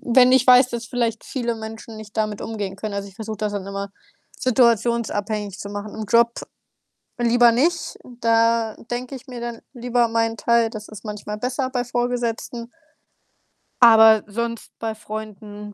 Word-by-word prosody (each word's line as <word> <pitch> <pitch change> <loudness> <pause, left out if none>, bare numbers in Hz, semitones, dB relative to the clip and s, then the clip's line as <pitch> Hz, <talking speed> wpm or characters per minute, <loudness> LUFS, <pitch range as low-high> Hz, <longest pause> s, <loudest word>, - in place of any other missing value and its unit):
wenn 255 0 +7
ich 260 0 +4
weiß, 250 0 +7
dass 235 -1 -4
vielleicht 230 -2 -2
viele 240 -3 -2
Menschen 220 0 -8
nicht 215 0 -11
damit 215 -2 -1
umgehen 205 -4 -5
können. 210 +1 -5
Also, 200 0 -4
ich 190 - -20
versuche 220 0 -5
das 210 -1 -2
dann 200 -1 -4
immer 200 0 -5 0.5
situationsabhängig 225 -4 +1
zu 200 - -6
machen. 205 +1 -6
Im 220 0 -5
Job 235 +2 +4 0.9
lieber 240 0 +5
nicht, 320 +8 0 0.2
da 230 -1 +2
denke 245 +2 -4
ich 270 +1 -9
mir 250 -2 -7
dann 235 -1 -5
lieber 245 -1 +1
meinen 225 0 0
Teil, 230 +2 +2
das 215 -1 -8
ist 215 0 -12
manchmal 210 0 -5
besser 255 +3 -2
bei 250 -2 -1
Vorgesetzten 240 -1 -3 1.1
aber 220 -2 +8
sonst 230 +2 -4
bei 225 -1 -3
Freunden, 210 -1 -8
225 Hz, 160 wpm, -22 LUFS, 215-240 Hz, 1.1 s, aber